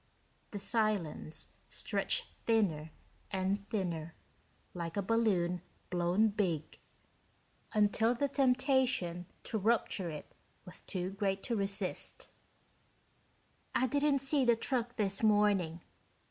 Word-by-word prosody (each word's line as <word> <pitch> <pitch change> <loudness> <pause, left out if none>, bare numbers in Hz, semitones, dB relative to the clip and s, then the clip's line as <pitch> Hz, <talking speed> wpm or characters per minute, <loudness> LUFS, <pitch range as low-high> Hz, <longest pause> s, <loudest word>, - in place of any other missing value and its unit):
The 205 - -5
silence 200 -8 -1 0.2
stretched - - -1 0.2
thinner 185 -9 +2 0.4
and 195 +1 -1
thinner, 170 -7 -2 0.6
like 170 0 -4
a - - +2
balloon 190 -5 +2 0.3
blown 180 +5 +3
big, 180 -7 -1 0.9
until 215 +2 +3
the 285 +4 +1
temptation 255 - +2 0.2
to 220 - -1
rupture 205 -4 +1
it 150 -2 -8 0.3
was 180 - -10
too 185 0 -3
great 195 -1 -1
to 235 - -1
resist. 195 -2 -3 1.4
"I 260 - +4
didn't 285 +1 +2
see 275 0 +2
the 240 -2 +5
truck 240 0 -1
this 195 -3 0
morning. 205 -6 +3
205 Hz, 105 wpm, -33 LUFS, 180-230 Hz, 1.4 s, the